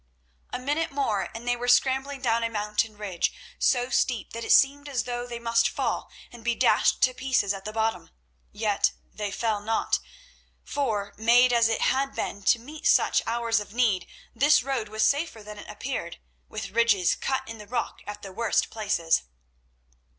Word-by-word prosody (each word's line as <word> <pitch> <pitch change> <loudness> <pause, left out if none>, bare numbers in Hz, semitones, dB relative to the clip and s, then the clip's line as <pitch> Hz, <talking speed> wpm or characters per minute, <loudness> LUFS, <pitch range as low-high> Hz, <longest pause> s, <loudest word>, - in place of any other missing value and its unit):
A - - -2
minute 290 +6 -1
more, 230 -9 -1
and 235 +2 -8
they 245 - +2
were 245 0 -5
scrambling 265 +2 +2
down 230 -1 +2
a 230 - 0
mountain 210 0 -1
ridge 195 -5 -1 0.3
so 250 -1 +2
steep 245 -5 0
that 230 0 -5
it - - -1
seemed 285 +1 +4
as 265 -3 -1
though 245 0 -4
they 240 -1 -5
must 230 0 +2
fall - - -2 0.2
and 240 -1 -13
be 240 0 +1
dashed - - +3
to 255 - +4
pieces 250 -6 +1
at 195 -1 -8
the 215 - -4
bottom. 220 0 -1 0.4
Yet 205 -1 +1 0.2
they 210 -1 -3
fell 215 +1 -1
not, 225 +2 0 0.6
for, 215 -8 -2
made 240 +3 +5
as 230 -1 +4
it 225 - 0
had 270 +1 +1
been 200 - -3
to 240 - +5
meet 295 +7 -5
such - - +4
hours 230 -1 +1
of 210 +1 -9
need, 215 -8 +2 0.3
this 280 +3 +4
road 255 -5 -2
was 215 +1 0
safer 280 -2 +1
than 210 0 -9
it - - -11
appeared, 210 -6 -5 0.3
with 205 -3 -6
ridges 210 -5 +3
cut 265 0 -2
in 225 -1 -8
the 210 - -11
rock 240 +2 -3
at 205 0 -7
the 195 - -7
worst 225 0 0
places. 195 -7 +1
230 Hz, 185 wpm, -26 LUFS, 210-250 Hz, 0.6 s, made